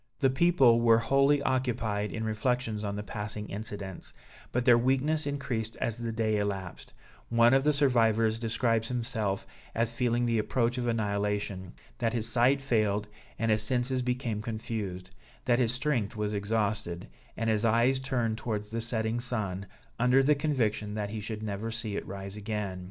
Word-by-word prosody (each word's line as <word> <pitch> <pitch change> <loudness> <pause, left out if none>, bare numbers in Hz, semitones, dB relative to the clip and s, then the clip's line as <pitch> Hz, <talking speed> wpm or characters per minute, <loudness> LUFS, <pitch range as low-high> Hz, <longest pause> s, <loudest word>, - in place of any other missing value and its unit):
The 135 -3 +3
people 135 -6 +4
were 115 -1 +6
wholly 140 +4 +3
occupied 120 -6 0
in 110 - -4
reflections 110 0 -1
on 100 -1 -2
the 105 - -4
passing 105 +1 -5
incidents; 100 -2 -6 0.4
but 125 0 0
their 120 -2 +7
weakness 135 +6 +1
increased 125 -6 -3
as 115 - -2
the 115 -1 -3
day 110 -1 0
elapsed; 95 -3 -4 0.4
one 115 +1 +5
of 135 0 +4
the 150 - +4
survivors 115 -6 +3
describes 115 0 0
himself 115 -5 0 0.3
as 115 0 +1
feeling 120 0 +1
the 115 -2 +1
approach 120 +3 0
of 120 - -2
annihilation, 100 -4 -1 0.3
that 115 -2 0
his 115 -2 -1
sight 125 +4 +3
failed, 105 -5 +1 0.3
and 115 -1 +1
his 110 0 +2
senses 125 +3 0
became 125 -3 -2
confused; 110 -5 -5 0.3
that 120 0 +3
his 120 -3 +2
strength 125 -5 -1
was 105 -1 -2
exhausted, 100 -3 -1 0.3
and 115 - -1
his 110 0 0
eyes 115 +4 +3
turned 120 -5 -1
towards 105 -2 -3
the 115 0 -2
setting 115 0 -1
sun, 100 -6 -2 0.3
under 125 +2 +4
the 150 +3 +5
conviction 115 -8 -1
that 105 -1 -3
he 110 -1 -4
should 110 0 -5
never 105 +1 -3
see 110 -2 -3
it - - -4
rise 100 0 -6
again. 105 -3 -4
115 Hz, 170 wpm, -29 LUFS, 105-125 Hz, 0.4 s, their